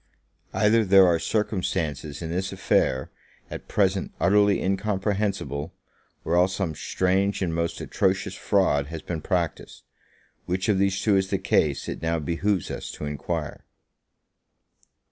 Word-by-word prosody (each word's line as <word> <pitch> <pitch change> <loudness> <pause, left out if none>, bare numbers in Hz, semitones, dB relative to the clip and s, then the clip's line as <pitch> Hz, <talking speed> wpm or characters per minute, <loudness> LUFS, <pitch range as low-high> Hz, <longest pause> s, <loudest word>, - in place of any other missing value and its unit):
Either 105 +3 +3
there 95 -1 +7
are 85 -2 +3
circumstances 85 -9 -2
in 80 - -4
this 95 +2 -2
affair 65 0 +1 0.4
at - - -7
present 95 -2 +1
utterly 100 +2 +4
incomprehensible, 95 -6 -1 0.5
or 85 - +1
else 90 +2 +3
some 95 -5 -2
strange 95 +5 0
and 85 -3 -1
most 85 0 -2
atrocious - - 0
fraud 70 0 +1
has 80 0 -7
been 80 -3 -4
practiced; 85 -3 -3 0.6
which 95 +3 -1
of 100 -3 +2
these 100 0 +1
two 105 -3 +2
is 95 0 +1
the 95 - +1
case 95 - +1
it - - -5
now 80 0 0
behoves 85 +5 -1
us - - -5
to - - -6
enquire. 75 -2 -4
95 Hz, 140 wpm, -25 LUFS, 80-100 Hz, 0.6 s, there